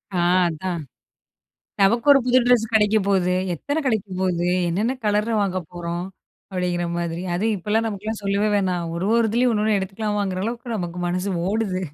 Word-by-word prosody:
ஆ - - +1 0.3
அதான். 170 +1 -3 1.0
நமக்கு 230 +6 +3
ஒரு 280 - +6
புது 250 0 +4
டிரெஸ் 245 -2 +4
கெடைக்க 215 -1 +4
போது 185 -2 +2 0.2
எத்தன 285 - -2
கெடைக்க 220 -6 0
போது 175 -2 0 0.2
என்னன்ன 215 +10 0
கலர்ல 210 +2 +1
வாங்க 185 -2 -1
போறோம். 175 0 -4 0.5
அப்டிங்கிற 180 -1 -1
மாதிரி. 170 0 -3
அதுவும் 215 +5 +1
இப்போலாம் 210 +4 0
நமக்கெல்லாம் 215 +1 -4
சொல்லவே 200 +1 +1
வேணாம். 185 -3 0
ஒரு 175 +3 -2
ஒரு 230 -1 +3
இதுலயும் 245 +3 +2
1ன்னு 215 0 +2
எடுத்துக்கலாமாங்குற 195 -1 -2
அளவுக்கு 235 +1 -4
நமக்கு 175 -2 -4
மனசு 180 +3 -2 0.2
ஓடுது. 200 -3 -1
200 Hz, 155 wpm, -22 LUFS, 180-220 Hz, 1.0 s, ஒரு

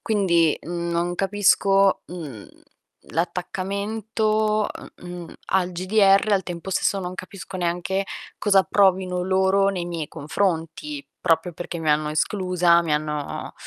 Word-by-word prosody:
Quindi 175 -7 +2
non 170 +1 -2
capisco, 195 0 +3
mhmm, 150 - -8 0.6
l'attaccamento, 210 +5 -1 0.4
uhm, 175 -1 -8
al 185 -1 +1
GDR, 195 +3 +3
al 195 -2 +3
tempo 175 +1 -6
stesso 195 +1 +1
non 180 0 -5
capisco 185 0 -8
neanche 180 +3 -1 0.3
cosa 200 -2 +4
provino 185 -2 +2
loro 190 +1 +3
nei 185 -3 -2
miei 165 -4 -4
confronti, 185 - -2
proprio 165 +2 +1
perché 170 +1 -6
mi 160 -2 0
hanno 150 0 +2
esclusa, 180 +1 +2
mi 160 -3 0
hanno 150 -1 -3
185 Hz, 120 wpm, -23 LUFS, 170-195 Hz, 0.6 s, cosa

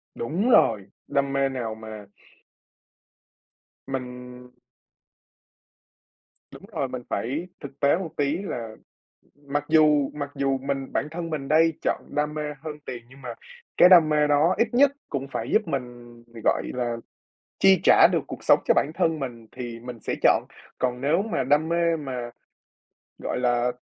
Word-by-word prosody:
Đúng 180 - -1
rồi! 110 - +4 0.2
Đam 140 0 0
mê 135 0 +2
nào 115 -4 -4
mà 110 -2 -9 1.8
Mình 125 -1 -7 2.0
Đúng - - -12
rồi, 135 -8 -2
mình 125 -1 -6
phải 145 +10 -3
thực 140 -1 -10
tế 145 +3 +3
một 180 -4 -5
tí 145 +3 +1
là 115 - -5 0.7
mặc 145 +1 -1
dù 150 -3 +4
mặc 145 -1 -5
dù 135 -1 0
mình 135 0 -3
bản 150 - 0
thân 165 0 -5
mình 145 -3 -4
đây 160 +1 +4
chọn - - -1
đam 150 +1 0
mê 150 -1 -3 0.2
hơn 155 -2 -6
tiền 120 -2 -7
nhưng 135 +1 -16
mà 120 -2 -6 0.4
cái 180 - +8
đam 170 -4 +7
mê 150 -1 +3
đó 150 +5 +3
ít 230 - +3
nhất 275 +2 +5 0.2
cũng 140 -1 -3
phải 115 -3 -5
giúp 215 -5 +2
mình, 120 -4 -6 0.2
gọi - - +2
là, 120 -2 -2 0.6
chi 190 -3 +5
trả - - +7
được - - +2
cuộc - - -9
sống - - +6
cho - - +5
bản 150 - +1
thân 160 -1 +1
mình 120 -4 -6
thì 120 -2 -7
mình 120 -1 -9
sẽ - - -3
chọn. - - +4 0.3
Còn 125 -1 -1
nếu 155 +7 +2
mà 205 -11 -2
đam 150 +4 +2
mê 170 -1 +2
mà, 125 -5 -5 0.9
gọi - - -2
là, 120 0 +1
140 Hz, 165 wpm, -25 LUFS, 125-155 Hz, 2.0 s, cái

